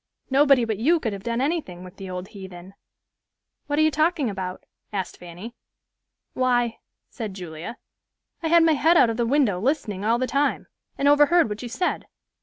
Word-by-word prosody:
Nobody 275 Hz, -3 st, +5 dB
but 220 Hz, -3 st, -3 dB
you 325 Hz, +9 st, +3 dB
could 225 Hz, -8 st, -2 dB
have 195 Hz, -, -6 dB
done 235 Hz, +3 st, -2 dB
anything 275 Hz, -, -2 dB
with 185 Hz, +1 st, -12 dB
the 195 Hz, -1 st, -8 dB
old 180 Hz, +1 st, -6 dB
heathen." 190 Hz, -2 st, -11 dB, 0.9 s
"What 290 Hz, 0 st, -1 dB
are 310 Hz, -, +4 dB
you 310 Hz, -, +3 dB
talking 310 Hz, -5 st, +1 dB
about?" 185 Hz, -1 st, -5 dB, 0.3 s
asked 195 Hz, -3 st, -4 dB
Fanny. 180 Hz, +6 st, -9 dB, 0.8 s
"Why," 245 Hz, -2 st, +1 dB, 0.3 s
said 215 Hz, -6 st, -6 dB
Julia, 175 Hz, +4 st, -7 dB, 0.6 s
"I 330 Hz, -, -1 dB
had 335 Hz, +1 st, +5 dB
my 325 Hz, -1 st, +4 dB
head 325 Hz, +4 st, +4 dB
out 230 Hz, -, +5 dB
of 225 Hz, -, -5 dB
the 235 Hz, -1 st, 0 dB
window, 245 Hz, -8 st, +2 dB
listening 215 Hz, -5 st, -1 dB
all 225 Hz, +2 st, +2 dB
the 255 Hz, -, 0 dB
time, 280 Hz, +3 st, 0 dB, 0.3 s
and 280 Hz, -, +1 dB
overheard 295 Hz, 0 st, +5 dB
what 210 Hz, +1 st, -5 dB
you 245 Hz, -, -6 dB
said. 360 Hz, +9 st, -2 dB
235 Hz, 185 wpm, -24 LUFS, 195-290 Hz, 0.9 s, Nobody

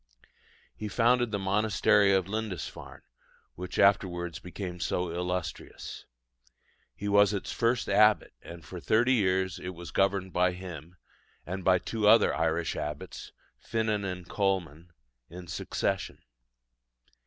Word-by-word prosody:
He 110 Hz, -, -5 dB
founded 120 Hz, +3 st, +2 dB
the 105 Hz, -, -1 dB
monastery 100 Hz, 0 st, +3 dB
of 95 Hz, -2 st, +2 dB
Lindisfarne, 105 Hz, -4 st, -5 dB, 0.5 s
which 90 Hz, +1 st, -7 dB
afterwards 90 Hz, -4 st, +2 dB
became 90 Hz, +1 st, -7 dB
so 90 Hz, 0 st, -1 dB
illustrious. 90 Hz, -2 st, -5 dB, 0.9 s
He 105 Hz, -, -5 dB
was 100 Hz, 0 st, +5 dB
its 100 Hz, -, -4 dB
first 120 Hz, +1 st, 0 dB
abbot; 105 Hz, +1 st, +4 dB
and 85 Hz, -2 st, -11 dB
for -, -, -8 dB
thirty 120 Hz, +4 st, +3 dB
years 95 Hz, -4 st, +1 dB
it 90 Hz, 0 st, -6 dB
was 85 Hz, -3 st, -9 dB
governed 95 Hz, 0 st, +1 dB
by 90 Hz, 0 st, +2 dB
him 90 Hz, -2 st, -9 dB, 0.5 s
and 95 Hz, +1 st, -5 dB
by 90 Hz, 0 st, +5 dB
two 105 Hz, +3 st, -1 dB
other 115 Hz, +2 st, +6 dB
Irish 80 Hz, +1 st, 0 dB
abbots, 75 Hz, -1 st, -6 dB, 0.3 s
Finan 110 Hz, -2 st, -1 dB
and 90 Hz, -2 st, -5 dB
Colman, 90 Hz, -5 st, -2 dB, 0.4 s
in 90 Hz, +1 st, -9 dB
succession. 95 Hz, +3 st, -2 dB
95 Hz, 125 wpm, -29 LUFS, 90-105 Hz, 0.9 s, other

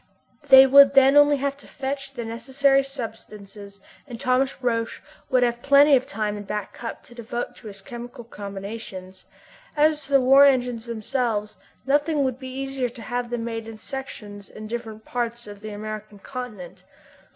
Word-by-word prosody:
They 265 Hz, 0 st, +10 dB
would 275 Hz, +1 st, +7 dB
then 270 Hz, +1 st, +6 dB
only 290 Hz, 0 st, +6 dB
have 275 Hz, 0 st, -2 dB
to -, -, -16 dB
fetch 275 Hz, 0 st, -5 dB
the 240 Hz, -3 st, -5 dB
necessary 265 Hz, +4 st, +2 dB
substances 215 Hz, -6 st, -8 dB, 0.3 s
and 240 Hz, -4 st, -8 dB
Thomas 255 Hz, +1 st, 0 dB
Roch 230 Hz, -2 st, -1 dB, 0.3 s
would 255 Hz, -1 st, +3 dB
have 240 Hz, 0 st, 0 dB
plenty 280 Hz, +1 st, +6 dB
of 255 Hz, -, 0 dB
time 210 Hz, 0 st, -2 dB
in -, -, -6 dB
Back 210 Hz, 0 st, -5 dB
Cup 235 Hz, -, -7 dB
to -, -, -16 dB
devote 240 Hz, 0 st, -5 dB
to 225 Hz, -, -11 dB
his 200 Hz, -1 st, -10 dB
chemical 240 Hz, +2 st, -9 dB
combinations. 200 Hz, -3 st, -8 dB, 0.5 s
As 300 Hz, -1 st, +2 dB
to 280 Hz, -, -7 dB
the 275 Hz, -, +7 dB
war 270 Hz, +2 st, +6 dB
engines 245 Hz, -4 st, +2 dB
themselves 220 Hz, -2 st, -2 dB, 0.3 s
nothing 290 Hz, +2 st, +2 dB
would 260 Hz, -1 st, -2 dB
be 260 Hz, -1 st, -7 dB
easier 270 Hz, 0 st, -3 dB
than 240 Hz, -, -13 dB
to 235 Hz, -, -10 dB
have 245 Hz, +2 st, -3 dB
them 240 Hz, -1 st, -3 dB
made 225 Hz, -1 st, -5 dB
in 225 Hz, -1 st, -9 dB
sections 215 Hz, -5 st, -8 dB
in 215 Hz, -, -10 dB
different 220 Hz, -1 st, -6 dB
parts 240 Hz, -1 st, -3 dB
of 205 Hz, -1 st, -11 dB
the 215 Hz, -, -7 dB
American 215 Hz, 0 st, -7 dB
continent. 200 Hz, -6 st, -8 dB
240 Hz, 175 wpm, -24 LUFS, 215-270 Hz, 0.5 s, They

